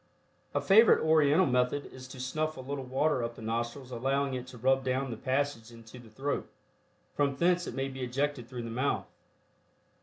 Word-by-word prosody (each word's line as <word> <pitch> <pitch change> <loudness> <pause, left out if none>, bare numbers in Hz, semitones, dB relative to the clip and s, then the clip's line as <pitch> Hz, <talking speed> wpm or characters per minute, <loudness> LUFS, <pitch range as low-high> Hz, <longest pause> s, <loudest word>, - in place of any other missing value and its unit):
A - - +2
favorite 215 +4 +6
Oriental 155 +2 +5
method 125 +2 +1
is 130 0 -10
to 130 0 -10
snuff 155 +5 -2
a - - -6
little 135 +1 -4
water 130 +1 +1
up 115 0 -4
the - - -10
nostrils 120 +4 -3
allowing 135 +3 0
it 125 0 -4
to 125 - -11
run 130 +3 +3
down 130 0 -1
the - - -3
passage 130 -1 -1
into 115 +1 -13
the 120 -2 -14
throat, 135 +6 -3 0.6
from 140 -1 +1
thence 175 +3 +2
it - - -5
may 135 0 -1
be 135 -1 -7
ejected 125 0 -2
through 125 -2 -5
the 115 - -5
mouth. 130 +5 0
130 Hz, 190 wpm, -30 LUFS, 125-145 Hz, 0.6 s, favorite